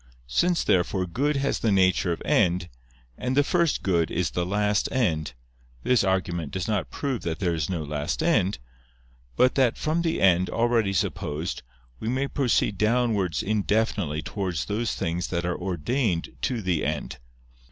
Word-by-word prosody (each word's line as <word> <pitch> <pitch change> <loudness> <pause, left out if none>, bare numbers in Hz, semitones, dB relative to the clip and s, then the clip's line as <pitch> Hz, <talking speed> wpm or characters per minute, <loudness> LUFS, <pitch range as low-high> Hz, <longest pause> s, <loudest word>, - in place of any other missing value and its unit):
Since, 175 - +1
therefore, 90 +1 +1
good 140 - 0
has 140 0 0
the 110 - +1
nature 95 -2 +3
of 85 - -4
end, 85 0 +2 0.5
and 125 +2 -1
the 145 - +6
first 170 +1 +1
good 85 -4 +1
is 90 -1 -1
the 90 0 -1
last 105 +1 +1
end, 80 - 0 0.5
this 125 -4 +3
argument 90 -5 -1
does 95 -2 -3
not 105 -7 -1
prove 135 -6 -3
that 80 -1 -3
there 90 -3 0
is 80 -3 -2
no 85 -4 -2
last 75 -4 -2
end; 95 +3 +2 0.8
but 125 - +4
that 130 -4 +2
from 160 +2 0
the 165 -1 0
end, 90 -1 +4
already 115 -3 +1
supposed, 80 -3 -2 0.4
we 110 - -3
may 135 +3 0
proceed 120 -7 +1
downwards 110 -6 +1
indefinitely 105 -6 0
towards 90 -9 -3
those 110 - -2
things 85 +2 -2
that 85 -1 -2
are 90 - -1
ordained 90 - -1
to 120 -5 -1
the 90 -4 0
end. 75 -3 -3
95 Hz, 165 wpm, -25 LUFS, 85-120 Hz, 0.8 s, the